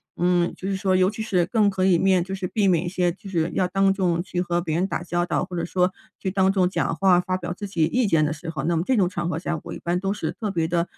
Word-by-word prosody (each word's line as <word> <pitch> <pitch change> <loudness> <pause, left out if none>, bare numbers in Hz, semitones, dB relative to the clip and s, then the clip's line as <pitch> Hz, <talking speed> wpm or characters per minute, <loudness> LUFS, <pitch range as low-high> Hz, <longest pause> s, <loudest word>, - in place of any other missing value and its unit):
嗯， 175 0 +1
就 190 - -5
是 195 - 0
说 190 -1 +1
尤 185 +1 +4
其 220 +1 -5
是 185 -5 +1
更 210 -4 +2
可 190 -1 0
以 185 -3 +4
面 185 0 +3
就 190 +2 -5
是 190 -1 -4
避 200 +1 +1
免 175 -1 +2
一 - - -3
些 180 0 0
就 195 - -13
是 165 -2 0
要 180 - +2
当 195 +1 +2
众 180 -3 0
去 180 -1 -4
和 175 -1 0
别 160 -3 -2
人 180 +3 +1
打 195 - -3
交 175 0 -1
道， - - 0
或 180 -1 -6
者 - - -1
说 180 +1 +1 0.3
去 190 - -2
当 190 0 +2
众 185 -2 +2
讲 - - -1
话 185 -2 +4
发 185 +1 -1
表 175 -1 -4
自 205 +3 -5
己 170 -5 +1
意 245 +8 +1
见 165 -5 +3
的 150 - 0
时 160 +2 -7
候， 160 - -3
那 170 +1 +1
么 165 - 0
这 265 - +2
种 190 -6 +2
场 175 -2 -3
合 160 -2 -2
下， 170 -1 -3
我 - - -7
一 - - -7
般 175 +1 -1
都 195 +1 -1
是 210 - -3
特 215 -3 -4
别 165 -4 0
地 170 0 +1
180 Hz, 335 characters per minute, -24 LUFS, 175-195 Hz, 0.3 s, 尤